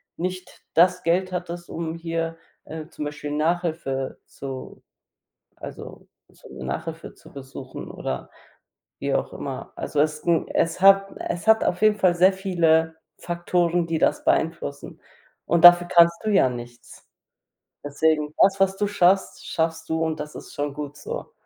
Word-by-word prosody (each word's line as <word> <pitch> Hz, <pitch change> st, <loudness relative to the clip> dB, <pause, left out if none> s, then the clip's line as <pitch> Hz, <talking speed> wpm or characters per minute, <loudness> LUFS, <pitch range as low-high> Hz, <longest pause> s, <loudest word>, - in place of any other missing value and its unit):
nicht 185 Hz, +1 st, -6 dB
das 180 Hz, +2 st, +4 dB
Geld 185 Hz, +3 st, +1 dB
hattest, 175 Hz, -1 st, -5 dB
um 165 Hz, 0 st, -4 dB
hier, 165 Hz, 0 st, -3 dB, 0.3 s
äh, 155 Hz, 0 st, -8 dB
zum 155 Hz, -, -7 dB
Beispiel 145 Hz, 0 st, -6 dB
Nachhilfe 155 Hz, -4 st, -2 dB
zu 135 Hz, -1 st, -8 dB, 0.8 s
also, -, -, -10 dB, 0.2 s
zu -, -, -17 dB
Nachhilfe -, -, -5 dB
zu -, -, -18 dB
besuchen 135 Hz, -1 st, -9 dB
oder 65 Hz, -, -5 dB, 0.7 s
wie -, -, -1 dB
auch -, -, -1 dB
immer. -, -, -7 dB
Also, 145 Hz, -, -2 dB
es 155 Hz, +1 st, +2 dB
ist 150 Hz, -, -16 dB
'n 170 Hz, -2 st, +2 dB
es 165 Hz, +2 st, 0 dB
hat 195 Hz, +1 st, +6 dB, 0.2 s
es 170 Hz, +2 st, -4 dB
hat 220 Hz, 0 st, +5 dB
auf 180 Hz, +3 st, -1 dB
jeden 215 Hz, -1 st, +5 dB
Fall 185 Hz, -3 st, +3 dB
sehr 185 Hz, +3 st, +5 dB
viele 165 Hz, -4 st, +1 dB, 0.2 s
Faktoren, 175 Hz, 0 st, 0 dB
die 165 Hz, -1 st, -1 dB
das 150 Hz, -, +1 dB
beeinflussen 160 Hz, -3 st, -1 dB, 0.5 s
und 170 Hz, +1 st, +1 dB
dafür 175 Hz, 0 st, +9 dB
kannst 170 Hz, -1 st, +5 dB
du 215 Hz, -, 0 dB
ja 195 Hz, -10 st, +4 dB
nichts. 120 Hz, 0 st, -10 dB, 0.8 s
Deswegen, 150 Hz, +1 st, 0 dB
das, 195 Hz, 0 st, +4 dB
was 195 Hz, 0 st, +3 dB
du 205 Hz, 0 st, 0 dB
schaffst, 190 Hz, -1 st, +1 dB
schaffst 160 Hz, 0 st, -2 dB
du 160 Hz, 0 st, 0 dB
und 160 Hz, -1 st, -2 dB
das 150 Hz, 0 st, -7 dB
ist -, -, -10 dB
schon 145 Hz, -1 st, -3 dB
gut 145 Hz, 0 st, -7 dB
so. -, -, -7 dB
165 Hz, 155 wpm, -24 LUFS, 150-180 Hz, 0.8 s, dafür